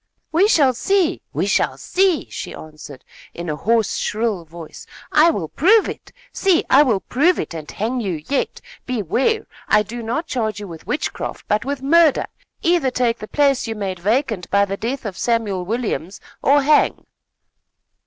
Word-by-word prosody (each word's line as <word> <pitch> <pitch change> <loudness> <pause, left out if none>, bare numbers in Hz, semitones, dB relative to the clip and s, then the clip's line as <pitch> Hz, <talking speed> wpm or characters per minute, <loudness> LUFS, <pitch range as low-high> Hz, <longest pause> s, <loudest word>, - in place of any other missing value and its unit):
"We 350 +6 +4
shall 285 - +4
see! 370 +6 +1
We - - -1
shall - - +1
see!" 370 -4 +1
she - - -6
answered, 150 -3 -11 0.3
in 170 -2 -4
a - - -2
hoarse, 225 +5 +1
shrill 210 -5 -1
voice. 165 0 -11 0.2
"I 310 +2 +6
will 195 - -2
prove 405 - +4
it. - - -8 0.2
See, 375 -4 +2
I 275 - +8
will 230 -9 +2
prove 335 +8 +2
it - - -4
and 155 -2 -7
hang 230 +5 -2
you 175 -8 -3
yet. 280 - -1 0.3
Beware! 255 - 0 0.2
I 210 0 +4
do 235 +3 -7
not 240 +9 -2
charge 220 -8 -2
you 205 - -7
with 165 -3 -11
witchcraft, 300 - -3
but 210 +3 0
with 275 -1 -3
murder. 320 +1 +4 0.4
Either 335 -6 +3
take 240 -2 0
the 215 - -7
place 275 -2 +2
you 225 - -3
made 195 -3 -4
vacant 220 -1 -1
by 200 0 +3
the 195 0 -4
death 245 +5 -4
of 195 -3 -5
Samuel 215 -6 0
Williams, 205 -4 -3 0.2
or 285 +1 +4
hang!" 300 +2 +3
235 Hz, 175 wpm, -20 LUFS, 200-290 Hz, 0.4 s, I